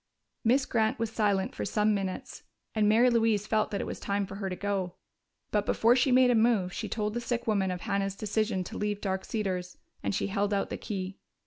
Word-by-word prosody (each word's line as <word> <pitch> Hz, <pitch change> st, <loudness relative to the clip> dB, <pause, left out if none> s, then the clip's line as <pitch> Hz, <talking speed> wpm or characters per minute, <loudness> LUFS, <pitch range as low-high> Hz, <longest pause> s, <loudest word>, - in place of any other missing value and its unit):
Miss 260 Hz, +4 st, +3 dB
Grant 220 Hz, -2 st, +1 dB
was 225 Hz, -1 st, -2 dB
silent 205 Hz, -4 st, +1 dB
for -, -, -4 dB
some 210 Hz, 0 st, +2 dB
minutes, 195 Hz, -2 st, -4 dB, 0.3 s
and 210 Hz, -1 st, +3 dB
Mary 235 Hz, +4 st, +5 dB
Louise 225 Hz, -3 st, +2 dB
felt 215 Hz, -1 st, +1 dB
that 200 Hz, -, -2 dB
it -, -, -3 dB
was -, -, -5 dB
time 200 Hz, 0 st, -1 dB
for 195 Hz, 0 st, -8 dB
her 195 Hz, -1 st, -3 dB
to 185 Hz, -, -3 dB
go. 190 Hz, -2 st, -2 dB, 0.6 s
But 210 Hz, -1 st, +2 dB
before 235 Hz, +2 st, +4 dB
she 260 Hz, +1 st, +3 dB
made 250 Hz, 0 st, +6 dB
a -, -, +4 dB
move, 220 Hz, -6 st, +3 dB
she -, -, -4 dB
told 210 Hz, -1 st, -1 dB
the 240 Hz, -, -2 dB
sick 240 Hz, 0 st, -2 dB
woman 200 Hz, -4 st, +1 dB
of 180 Hz, -1 st, -3 dB
Hannah's 200 Hz, -2 st, -1 dB
decision 210 Hz, -2 st, -1 dB
to -, -, -7 dB
leave 210 Hz, -1 st, -1 dB
Dark 190 Hz, -2 st, -2 dB
Cedars, 185 Hz, -4 st, -3 dB, 0.2 s
and -, -, -1 dB
she -, -, 0 dB
held 205 Hz, +1 st, 0 dB
out 200 Hz, -, -1 dB
the -, -, -2 dB
key. 190 Hz, -2 st, -5 dB
210 Hz, 225 wpm, -29 LUFS, 195-225 Hz, 0.6 s, made